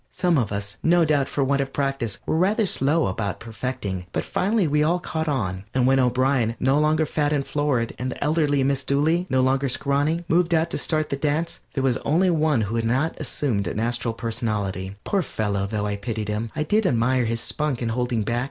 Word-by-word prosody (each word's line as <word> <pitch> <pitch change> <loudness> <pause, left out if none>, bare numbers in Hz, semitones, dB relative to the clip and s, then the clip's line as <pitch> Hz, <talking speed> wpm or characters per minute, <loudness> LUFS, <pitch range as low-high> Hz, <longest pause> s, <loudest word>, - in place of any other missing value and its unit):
Some 175 -5 +2
of 110 -5 -1
us, 100 0 -4
no 170 0 +4
doubt 145 -3 +2
for 140 - 0
want 140 +1 +1
of 135 0 -3
practice, 135 -6 -1
were - - 0
rather 205 +6 +2
slow 155 -2 +1
about 100 0 -2
perfecting, 110 -5 -5
but - - -1
finally 205 -1 +1
we 150 0 +2
all 165 +4 +3
caught 160 -2 -3
on, 95 -10 -1
and 130 -1 +3
when 135 +1 +4
O'Brien, 125 -2 +2
no 135 +3 +3
longer 155 +1 +2
fat 150 0 0
and 140 -2 0
florid, 145 -6 0
and 130 +1 -2
the - - -5
elder 155 +1 +2 0.2
Miss 135 0 0
Dooley, 155 +7 +1
no 130 0 +2
longer 135 +1 +2
scrawny, 145 +6 0
moved 170 +1 +2
out 165 +1 +1
to - - -1
start 155 -1 0
the - - -1
dance, 155 +4 -1 0.2
there 135 - 0
was 130 -2 +2
only 175 +7 +2
one 155 -6 +2
who 110 +2 -2
had 115 - 0
not 135 +8 +1
assumed 120 -9 -1
an 95 - -3
astral 115 0 -1
personality. 105 -5 -3
Poor 200 - +1
fellow, 100 - -2
though 105 0 -2
I 100 -1 -2
pitied 110 0 -4
him, 105 +2 -2
I 155 - 0
did 210 +6 +2
admire 125 0 +2
his 115 +1 -1
spunk 145 +1 -1
in 115 - -1
holding 120 -1 -1
back. 120 +3 -1
135 Hz, 215 wpm, -24 LUFS, 115-155 Hz, 0.2 s, no